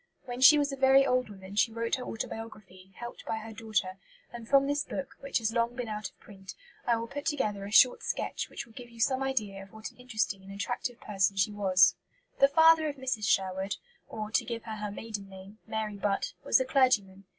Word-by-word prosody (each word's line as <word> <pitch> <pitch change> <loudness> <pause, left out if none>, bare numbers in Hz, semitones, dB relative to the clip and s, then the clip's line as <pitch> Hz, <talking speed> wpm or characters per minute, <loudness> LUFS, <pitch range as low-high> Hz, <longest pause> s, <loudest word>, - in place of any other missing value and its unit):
When 245 0 -6
she 300 +4 +9
was 290 -1 +1
a - - -3
very 270 0 +5
old 255 -3 +1
woman 195 -1 -10
she 220 +2 +3
wrote 230 +1 -3
her 255 - -6
autobiography, 210 -5 -7
helped 240 0 -8
by 220 - -1
her 220 0 -8
daughter; 205 -4 -2 0.3
and 235 -1 -8
from 275 -1 +5
this 285 0 0
book, 275 - -6
which 275 - -1
has 225 -2 0
been 230 - -2
long 235 +1 -1
out 210 -3 -4
of - - -34
print, 195 -2 -12 0.3
I 235 - +4
will 230 0 -3
put 285 +4 -6
together 210 -10 -1
a 200 - -7
short 250 +3 +6
sketch - - -3
which - - -6
will 230 - -20
give 240 0 -10
you 230 -1 -16
some 260 +3 +2
idea 215 -8 -2
of 195 0 -13
what 220 0 -7
an - - -27
interesting 225 -6 -2
and 195 +1 -12
attractive 245 +4 -4
person 195 -1 0
she 195 +2 +2
was. 190 -2 +4 0.5
The 275 - +7
father 320 +2 +5
of 285 - -5
Mrs. 255 -6 -2
Sherwood 190 0 0 0.3
or, 215 -1 -5
to - - +2
give 230 -1 -5
her 220 -2 -6
her 210 0 -4
maiden 205 -1 -6
name, 195 +3 -12
Mary 215 -2 -3
Butt 200 0 -1
was - - +4
a 260 - 0
clergyman. 210 -8 +2
220 Hz, 225 wpm, -29 LUFS, 200-255 Hz, 0.5 s, she